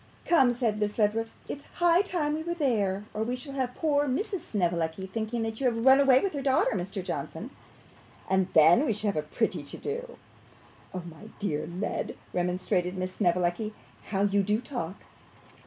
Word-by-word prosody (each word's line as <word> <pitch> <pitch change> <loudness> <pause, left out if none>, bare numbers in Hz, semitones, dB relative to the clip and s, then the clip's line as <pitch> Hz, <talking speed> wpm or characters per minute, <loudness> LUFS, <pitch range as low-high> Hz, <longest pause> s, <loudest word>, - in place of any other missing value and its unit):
'Come,' 270 -8 +5
said 230 -4 0
Miss 210 0 -1
Ledrook, 220 +1 +2 0.2
'it's 285 - -6
high 345 +1 +5
time 340 -7 -1
we 310 - -2
were 340 +1 -3
there, 210 - 0
or 215 - -3
we 240 +3 -1
shall 265 +2 -8
have 255 -2 -2
poor 290 -2 +1
Mrs. 385 - -1
Snevellicci 175 - -1
thinking 225 +4 -3
that 225 0 -4
you 265 - +3
have 230 -1 0
run 265 +1 +8
away 270 -2 +6
with 390 - -1
her 285 - -3
daughter, 265 -1 +3
Mr. 190 0 -3
Johnson; - - -5 0.8
and 190 -1 +2
then 160 - +7
we 225 - +2
should 210 0 -1
have - - -12
a 155 - +1
pretty 150 - -1
to - - -8
do.' 480 +3 -5 0.7
'My 175 +2 -8
dear 165 -8 -2
Led,' 180 +4 -3 0.2
remonstrated 180 0 0
Miss 185 0 -3
Snevellicci, 180 +3 0 0.3
'how 195 -1 0
you 200 0 +3
do 210 +2 +1
talk! 205 -9 -5
215 Hz, 180 wpm, -28 LUFS, 185-270 Hz, 0.8 s, run